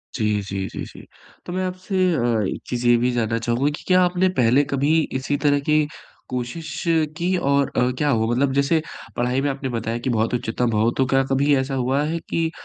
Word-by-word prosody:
जी, 105 -3 0
जी, 95 -1 -4
जी, - - -6
जी, - - -13 0.4
तो 175 - -6
मैं 185 0 -1
आपसे 185 +2 -5 0.2
अ, - - 0 0.3
एक - - -8
चीज़ 125 0 -2
ये 120 - +6
भी 125 +2 +1
जानना 115 -2 0
चाहूँगा 120 +4 0
कि - - -13
क्या 185 0 +5
आपने 180 +1 +2
पहले 125 +4 +4
कभी 140 +1 0 0.3
इसी 145 +2 -1
तरह 145 -1 +3
की 150 +1 +2 0.4
कोशिश 130 +6 -5 0.3
की 180 +2 0
और 140 -4 +1
अ, 125 0 +3
क्या 150 +1 +1
हुआ? 110 -4 +2
मतलब 135 +2 +1
जैसे 140 +4 +2 0.3
पढ़ाई 125 +2 0
में 145 - 0
आपने 135 -1 -3
बताया 115 -1 -2
कि 125 - -3
बहुत 115 -1 0
उच्चतम 120 0 -1
हो, 110 +2 +3
तो 130 - +3
क्या 135 +1 +2
कभी 140 +2 +3
ऐसा 130 +1 -2
हुआ 130 +2 +1
है 160 +2 -2
कि 165 -1 0
135 Hz, 215 wpm, -22 LUFS, 120-150 Hz, 0.4 s, ये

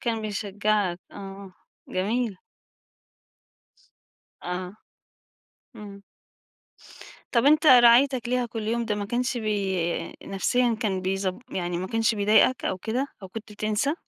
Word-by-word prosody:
كان 225 -2 -2
بيشجعك 205 -3 -1
آه، 195 -1 -9 0.4
جميل. 215 +3 -1 2.1
آه. 180 +2 -5 1.0
إمم. 200 -2 -10 1.3
طب، 235 -1 +3
أنت 305 +3 +4
رعايتك 250 -1 +6
ليها 250 -1 0
كل 225 -1 -6
يوم 235 +1 0
ده 215 - -1
ما 205 0 -3
كانش 245 +3 -1
بي 195 -6 -1
نفسيًا 235 +4 0
كان 195 -4 -1
بيز 190 0 0 0.2
يعني 175 -1 -2
ما 185 - -3
كانش 225 +2 +1
بيضايقك 210 +4 +3
أو 190 - -1
كده؟ 240 +8 -2 0.2
أو 190 - -8
كنت 220 +2 -9
بتنسى؟ 215 +8 -1
215 Hz, 120 wpm, -25 LUFS, 195-235 Hz, 2.1 s, رعايتك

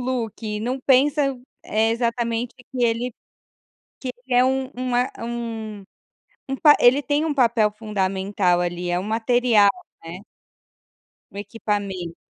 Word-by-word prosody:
look. 225 -4 -3
Não 250 +4 -2
pensa, 275 +1 +3 0.3
eh, 220 +1 +1
exatamente 235 0 -1 0.2
que 250 -2 -3
ele 235 +2 0 0.9
que 265 - -5 0.2
ele 255 - -2
é 250 - +5
um 265 0 0
um 250 -1 -1
é 250 +1 +1
um 225 -3 -5 0.7
um 270 - -1
pa 295 0 +7
ele 260 +4 +5
tem 290 +2 0
um 305 - 0
papel 230 -5 +3
fundamental, 195 -3 0
ali, 175 0 -2
é 175 0 +1
um - - -5
material, 225 0 +3 0.3
né? 170 +3 -8 1.1
O - - -15
equipamento. 200 -5 -4
230 Hz, 135 wpm, -22 LUFS, 205-255 Hz, 1.1 s, pa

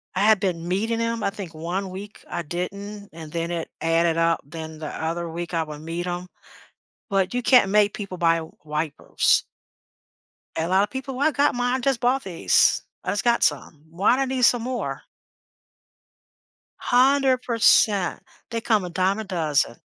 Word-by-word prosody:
I 190 - 0
had 215 -1 +5
been 175 -4 -2
meeting 225 +5 0
'em, 230 -1 -1
I - - +2
think 195 -5 -8
one 175 +5 -3
week 200 +3 -9
I - - -3
didn't, 200 +5 -6
and 160 -2 -10
then 170 0 -2
it 170 -1 -3
added 165 0 +2
up, 165 0 +2
then 160 +1 -8
the 155 - -5
other 165 +1 -3
week 170 +1 -6
I 165 -1 +1
would 150 -1 -9
meet 165 +3 -4
'em, 180 +1 -4 0.8
but 195 +2 +1
you 245 - 0
can't 240 -6 +5
make 210 -1 +4
people 195 -3 -6
buy 165 -1 +3 0.2
wipers. 150 -1 +1 1.1
A 160 +1 -1
lot 190 +2 +4
of 205 - -7
people, 265 0 -5
"Well, 280 - +1
I - - -1
got 285 +2 +2
mine, 245 +1 +1
I - - 0
just 270 -1 +1
bought 255 +2 +2
these, 175 -4 +3 0.2
I - - -2
just 200 +2 -2
got 235 0 +2
some, 150 0 -1
why 185 +8 +3
do 270 - 0
I - - +2
need 260 -1 -2
some 245 -1 +4
more?" 250 +1 -4 1.8
100%. 245 -7 +3 0.3
They 230 -1 -2
come 220 -4 +1
a 180 - -5
dime 190 +3 +1
a 220 - -4
dozen. 155 - 0
190 Hz, 180 wpm, -24 LUFS, 165-230 Hz, 1.8 s, had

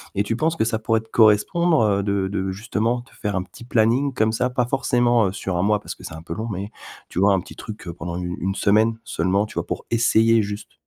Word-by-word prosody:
et 100 - +2
tu 110 +2 -2
penses 160 +4 0
que 110 - +2
ça 110 -1 -1
pourrait 110 0 +1
te 110 - -14
correspondre, 140 - +4
heu, 100 -2 +2
de 100 -1 0
de 95 -1 -2
justement 115 +4 -1
te - - -23
faire 105 -3 -2
un 90 - -1
petit 95 +5 -14
planning 120 +4 +2
comme 110 -1 +1
ça, 125 +2 0
pas 125 -1 0
forcément, 120 -4 +2
heu, - - -2
sur 95 -2 -4
1 85 - +1
mois 105 0 +2
parce - - -8
que - - -16
c'est - - -7
un 80 - -8
peu - - -5
long, 110 +2 -4
mais 100 +3 -5 0.4
tu - - -4
vois 100 +1 +5
un 95 - +2
petit - - -11
truc 105 -4 -9
heu, 85 - -4
pendant 90 +2 -5
u 90 0 -3
une 95 +2 -1
semaine 110 +2 +3
seulement 100 +1 0
tu - - -11
vois? - - -3
Pour - - -5
essayer, 115 -1 +4
juste? 105 0 -6
110 Hz, 265 wpm, -22 LUFS, 100-115 Hz, 0.4 s, vois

